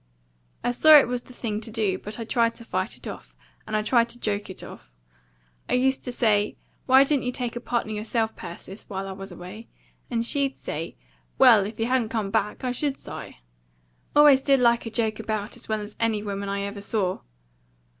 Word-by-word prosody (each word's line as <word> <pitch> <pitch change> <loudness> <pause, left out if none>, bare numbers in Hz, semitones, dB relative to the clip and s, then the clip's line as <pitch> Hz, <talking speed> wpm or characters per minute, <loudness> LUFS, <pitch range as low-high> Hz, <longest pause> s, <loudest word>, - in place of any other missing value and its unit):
I 245 - +1
saw 310 +5 +8
it 285 - +5
was 245 0 -2
the - - -16
thing 215 -3 -3
to 225 - -6
do; 210 -4 0
but 210 +1 -8
I 230 - -5
tried 230 0 +1
to 230 - -11
fight - - -2
it - - -11
off, - - -9 0.3
and 215 - -2
I 215 - 0
tried 235 +1 +3
to 240 +1 -7
joke 205 -2 -2
it 190 - -8
off. - - -12 0.8
I - - 0
used 265 +1 +2
to 250 - -3
say, 210 -3 +1 0.3
'Why 265 +1 +7
didn't 275 -1 +1
you 250 - 0
take 245 -2 -3
a - - -3
partner 240 -2 -2
yourself, 220 +1 -1
Persis, 190 +4 -9
while 195 -1 -4
I - - -5
was 195 0 -7
away?' 200 +6 -10 0.4
And 235 -1 0
she'd 275 +1 +1
say, 160 +2 -5 0.4
'Well, 205 -3 +7
if 215 +1 -10
you 225 - +1
hadn't 245 -2 +1
come 215 -4 -2
back, 210 +6 -1
I 250 - 0
should, 275 +2 -2
Si.' - - -9 0.8
Always 290 -2 +7
DID 275 -1 +4
like 235 -1 +3
a - - -3
joke 220 -1 -1
about 215 -1 -3
as - - -11
well 215 -1 0
as 210 0 -8
any 225 -2 0
woman 200 -1 -4
I 200 0 -2
ever 200 0 -5
saw. 200 -3 -1
225 Hz, 215 wpm, -25 LUFS, 205-245 Hz, 0.8 s, saw